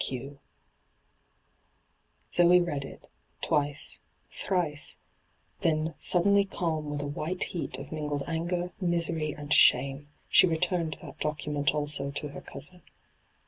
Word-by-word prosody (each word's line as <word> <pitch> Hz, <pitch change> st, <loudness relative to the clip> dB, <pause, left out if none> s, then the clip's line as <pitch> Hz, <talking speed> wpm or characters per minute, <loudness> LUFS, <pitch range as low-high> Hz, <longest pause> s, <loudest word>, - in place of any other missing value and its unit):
Q.' 135 Hz, +2 st, -4 dB, 1.9 s
Zoe 175 Hz, +1 st, +6 dB
read 150 Hz, -6 st, -1 dB
it 135 Hz, -, -11 dB, 0.2 s
— -, -, -41 dB
twice, 145 Hz, 0 st, 0 dB, 0.3 s
thrice; 165 Hz, -6 st, -1 dB, 0.6 s
then, 160 Hz, 0 st, +1 dB
suddenly 200 Hz, +3 st, +4 dB
o^m 165 Hz, -5 st, -2 dB
with 145 Hz, -1 st, -3 dB
a -, -, -3 dB
white 155 Hz, +5 st, -1 dB
heat 160 Hz, -7 st, -3 dB
of 135 Hz, +1 st, -9 dB
mingled 150 Hz, -2 st, -2 dB
anger, 175 Hz, +2 st, -2 dB
misery, 170 Hz, -3 st, 0 dB
and 145 Hz, 0 st, -1 dB
shame, 140 Hz, +3 st, +5 dB, 0.2 s
she -, -, +6 dB
returned 170 Hz, -1 st, 0 dB
that -, -, -10 dB
docu 150 Hz, -1 st, -2 dB
ment 145 Hz, 0 st, +1 dB
also 145 Hz, -2 st, 0 dB
to 145 Hz, +1 st, -4 dB
her 140 Hz, -, -9 dB
cousin. 145 Hz, +6 st, -9 dB
155 Hz, 130 wpm, -29 LUFS, 145-175 Hz, 1.9 s, Zoe